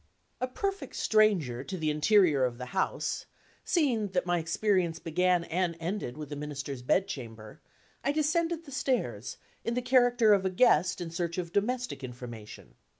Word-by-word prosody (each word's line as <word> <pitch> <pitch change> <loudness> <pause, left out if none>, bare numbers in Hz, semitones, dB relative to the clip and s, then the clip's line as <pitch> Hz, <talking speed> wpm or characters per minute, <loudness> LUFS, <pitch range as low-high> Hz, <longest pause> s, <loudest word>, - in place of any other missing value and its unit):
A 255 - +1
perfect 390 +9 -4
stranger 185 - +2
to 185 - -5
the 155 -2 0
interior 150 -2 +4
of 125 -2 0
the 125 0 -7
house - - -1 0.4
(seeing 255 - +1
that 180 -1 +1
my 175 -1 +1
experience 170 0 +1
began 180 +2 +1
and 170 0 -1
ended 170 -6 -4
with 150 -2 -7
the 145 - -5
Minister's 140 -2 -5
bedchamber), 125 - -2 0.4
I 280 - +2
descended 330 +2 0
the 280 - -11
stairs, 260 -1 -2 0.3
in 230 - -1
the 250 - 0
character 245 -3 +5
of 195 -2 +3
a 190 - +1
guest 180 -3 +3
in 170 -2 -5
search 170 0 -3
of 175 -2 -4
domestic 240 - -1
information. 120 -4 -9
180 Hz, 160 wpm, -29 LUFS, 150-235 Hz, 0.4 s, character